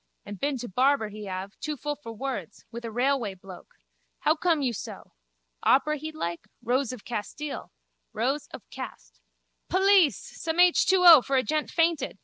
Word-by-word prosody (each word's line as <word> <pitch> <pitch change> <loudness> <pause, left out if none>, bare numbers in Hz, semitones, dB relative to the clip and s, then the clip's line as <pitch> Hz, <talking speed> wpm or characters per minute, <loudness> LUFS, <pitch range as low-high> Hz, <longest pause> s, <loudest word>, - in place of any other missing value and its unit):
And 205 -2 -8
been 280 -1 -1
to 245 0 -6
barber 255 +2 +2
he 210 0 -9
have. 190 +1 -6
Too 305 -2 -4
full 295 +2 -3
for 280 -6 -10
words. 225 - -6
With 235 +1 -7
a 230 - -4
railway 245 -3 0
bloke. 185 0 -13 0.5
How 305 - +4
come 320 -2 +1
you 250 -3 0
so? - - -8 0.5
Opera 305 +3 +3
he'd 310 +2 -7
like? 170 - -4 0.2
Rose 255 +2 0
of 250 -5 -10
Castile. 240 +6 -5 0.4
Rows 270 +6 -1
of - - -11
cast. - - -9 0.5
Police! 380 -3 +4
Some 320 0 -6
H2O 355 -3 +7
for 275 - -1
a 260 - +3
gent 305 +1 -1
fainted. 330 -9 0
270 Hz, 165 wpm, -27 LUFS, 215-305 Hz, 0.5 s, H2O